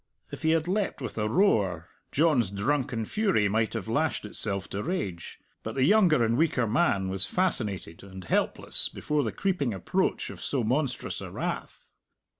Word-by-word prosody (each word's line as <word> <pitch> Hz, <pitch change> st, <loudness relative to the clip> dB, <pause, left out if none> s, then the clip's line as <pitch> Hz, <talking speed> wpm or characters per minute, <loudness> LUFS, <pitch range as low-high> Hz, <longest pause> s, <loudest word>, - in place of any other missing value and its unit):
If -, -, -8 dB
he 160 Hz, -, +1 dB
had 160 Hz, 0 st, +2 dB
leapt 195 Hz, +2 st, -1 dB
with 125 Hz, -6 st, -6 dB
a 105 Hz, 0 st, 0 dB
roar, 100 Hz, -, +2 dB, 0.2 s
John's 145 Hz, -, +3 dB
drunken 115 Hz, +3 st, -1 dB
fury 195 Hz, -, +1 dB
might 110 Hz, +1 st, 0 dB
have -, -, -4 dB
lashed -, -, 0 dB
itself 100 Hz, -2 st, -1 dB
to 100 Hz, -, -3 dB
rage. 105 Hz, -, -4 dB, 0.2 s
But 110 Hz, -, -6 dB
the 130 Hz, -, +2 dB
younger 170 Hz, -, +5 dB
and 115 Hz, +1 st, +1 dB
weaker 145 Hz, -7 st, +2 dB
man 105 Hz, -, +1 dB
was 95 Hz, 0 st, 0 dB
fascinated 105 Hz, -, 0 dB
and 95 Hz, -1 st, -10 dB
helpless -, -, +1 dB
before 150 Hz, 0 st, -1 dB
the 110 Hz, -, -2 dB
creeping 150 Hz, -, -1 dB
approach 95 Hz, -, -1 dB
of -, -, -11 dB
so 135 Hz, -4 st, -1 dB
monstrous 130 Hz, +5 st, -1 dB
a -, -, -6 dB
wrath. -, -, -5 dB
120 Hz, 170 wpm, -27 LUFS, 100-160 Hz, 0.2 s, younger